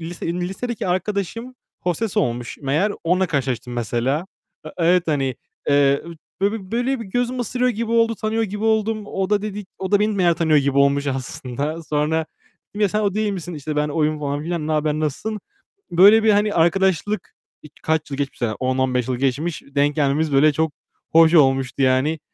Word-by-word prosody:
lise 170 +2 -6
lisedeki 190 +6 -4
arkadaşım 200 +6 -2 0.3
hostes 180 +4 -2
olmuş 120 0 -1
meğer. 155 +9 0
Onunla 180 +2 +2
karşılaştım 130 -5 -2
mesela. 120 - -1 0.4
A, - - -7
evet, 175 0 +2
hani, 135 -4 0 0.3
eee, 140 -1 +3
ü 170 - -9 0.3
böyle 200 +2 +2
bir 190 -3 -8
böyle 245 +2 0
bir 230 - -5
gözümü 245 +5 -2
ısırıyor 250 +2 0
gibi 230 0 -3
oldu. 230 0 +3
Tanıyor 220 +1 -1
gibi 210 0 -3
oldum. 220 -1 +1
O 195 0 -3
da 205 -1 +2
dedi, 210 -1 -5
o 190 0 -4
da 205 - +5
beni 210 -1 +1
baya 175 -2 +4
tanıyor 160 -2 +3
gibi 140 0 +1
olmuş 140 0 +3
aslında. 135 +4 -4
Sonra 155 +1 0 0.4
dedim 205 - -8
"Ya 205 - +4
sen 210 +3 -1
o 200 -2 0
değil 215 -1 0
misin?" 175 -2 -6
İşte, 150 +1 -5
"Ben 150 0 +1
oyum." 155 0 0
falan 145 0 -2
filan, 165 -2 -3
"Ne 155 - -1
haber 150 0 +1
nasılsın?" 155 +8 -3 0.5
Böyle 205 +6 +7
bir, 220 - +5
hani, 205 0 +2
arkadaşlık, 190 +4 +1 0.3
ik 150 - -14
kaç 155 -2 -1
yıl 135 - -3
geçmiş 140 -3 -4
aradan. 110 -3 -1
10, 130 0 0
15 125 -2 0
yıl 130 - -1
geçmiş, 140 +6 -1
denk 145 +1 +2
gelmemiz 150 +1 +1
böyle 150 +2 +5
çok 160 +1 0 0.4
hoş 165 +1 +6
olmuştu 135 -3 +3
yani. 135 +4 +2
165 Hz, 190 wpm, -21 LUFS, 140-205 Hz, 0.5 s, Böyle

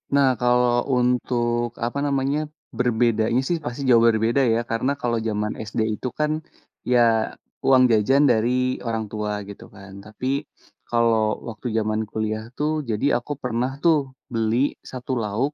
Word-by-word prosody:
Nah, 135 -2 +4
kalau 125 +1 +2
untuk 120 -1 0
apa 130 +4 -2
namanya 140 +1 0 0.3
berbedanya, 115 0 +1
sih, 175 - 0
pasti 120 +3 -4
jauh 115 -2 +6
berbeda, 115 +4 +2
ya, 115 - +2
karena 115 +4 -1
kalau 115 -2 0
zaman 105 -1 -2 0.2
SD 110 - -2 0.2
itu, - - -2
kan, 150 0 +1 0.5
ya, 115 -3 +2 0.3
uang 130 -1 +6
jajan 125 +6 +4
dari 110 +2 +2 0.3
orang 115 -2 -2
tua 105 -1 -3 0.2
gitu, 100 - -10
kan, 100 -1 -11
tapi 110 +4 -8 0.6
kalau 115 -2 +2
waktu 115 +3 -7
zaman 110 0 0
kuliah 110 0 -2
tuh 150 +1 0 0.2
jadi 110 +3 -1 0.2
aku 145 - -9
pernah, 125 +1 -1
tuh, 165 -2 +5 0.4
beli 115 0 +1 0.2
1 130 0 -7
lauk 115 +8 -1
120 Hz, 145 wpm, -23 LUFS, 110-125 Hz, 0.6 s, jauh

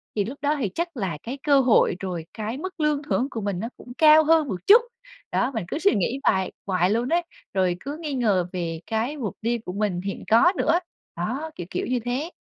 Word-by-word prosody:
thì 205 -2 +1
lúc 255 +7 -6
đó 290 +1 +1
thì 220 -7 0
chắc 340 -3 -3
là 190 -8 -2
cái 250 +4 -5
cơ 285 -2 +5
hội, 245 -7 +4
rồi 180 -4 -4
cái 220 +3 -4
mức 370 +4 -7
lương 300 -1 +1
thưởng 270 -3 0
của 225 - -4
mình 200 -3 -2
nó 225 +4 -3
cũng 245 - -12
cao 310 0 +7
hơn 315 -1 +4
một 190 -7 -3
chút. 445 +4 +9 0.5
Đó, - - +1
mình 220 -7 -3
cứ 295 - -3
suy 400 +4 +3
nghĩ 225 +7 0
hoài 190 -1 +2
hoài 185 -2 +1
luôn 235 +4 0
ấy, 340 +1 +3 0.3
rồi 185 -2 +1
cứ 285 +7 -6
nghi 300 -3 -3
ngờ 205 -9 +1
về 165 -3 -3
cái 230 +7 -1
mục 230 -8 -3
đi 235 +2 0
của 210 -5 -7
mình 200 -3 -1
hiện 195 +1 -5
có 290 - +6
nữa. 330 +2 +3 0.4
Đó, 255 - -3
kiểu 175 - -7
kiểu - - -2
như 250 0 0
thế. 260 +7 -2
235 Hz, 235 wpm, -24 LUFS, 195-295 Hz, 0.5 s, chút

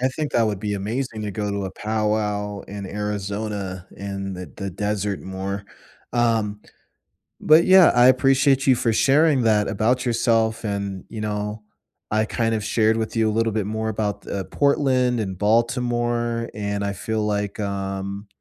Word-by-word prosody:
I 130 - +2
think 150 +3 -4
that 120 - +3
would 105 -3 -2
be 105 0 -2
amazing 110 +3 -3
to 105 - -3
go 105 +1 -3
to 100 -1 -2
a 95 - -4
powwow 105 -1 -1
in 100 0 -7
Arizona 100 -2 -4
in 100 -1 -5
the 90 -4 -8
the 100 0 -4
desert 105 +1 -2
more, 95 +1 -5 0.5
um, 115 -4 +1 0.8
but 155 +2 +5
yeah, 185 -1 +7
I 120 0 +6
appreciate 135 +1 +4
you 130 - +6
for 120 -1 +1
sharing 140 +3 +4
that 105 -2 +3
about 120 +5 +1
yourself, 115 -2 +1
and, 100 -3 -3
you 110 - -7
know, 105 0 -3 0.5
I 110 +1 +1
kind 115 0 0
of 110 - -2
shared 110 +1 +2
with 110 0 -3
you 110 -1 +2
a - - 0
little 115 +1 +1
bit 105 -2 -1
more 110 +1 -2
about 105 -1 -2
th - - -6
uh, 100 -1 -2
Portland 130 -4 +2
and 95 -4 -3
Baltimore, 120 +1 0
and 100 -1 -3
I 100 0 -1
feel 110 +4 -2
like, 105 0 -2
um, 100 0 -4
105 Hz, 175 wpm, -23 LUFS, 100-120 Hz, 0.8 s, yeah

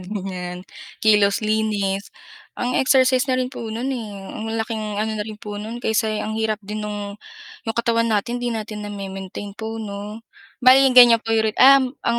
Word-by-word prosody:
ganyan, 185 -2 -6 0.4
kilos, 210 -1 +4
linis 210 -2 -1 0.5
ang 245 +1 -2
exercise 260 0 +3
na 255 - +2
rin 255 0 -1
po - - -7
no'n, 230 +4 -3
eh, 230 -4 -5 0.2
ang 215 - -6
laking 225 -1 -3 0.2
ano 220 0 -1
na 210 - -3
rin 215 -1 -7
po 205 -1 -7
non, 220 +3 -6
kaysa 220 -1 +1 0.2
ang 220 0 -4
hirap 220 -1 0
din 210 +2 -5
nung 205 -1 -5 0.5
yung 225 - -3
katawan 230 0 +1
natin 225 +3 0
hindi 245 - -2
natin 215 -1 -5
na-mi-maintain 195 0 -7
po 220 0 -5
'no. 210 +1 -7 0.4
Bale 265 +2 +7
ganyan 240 -2 +8
po 225 - -3
ri 220 -1 +2
um, 270 -1 +6
ang 235 0 +1
220 Hz, 175 wpm, -21 LUFS, 205-235 Hz, 0.5 s, ganyan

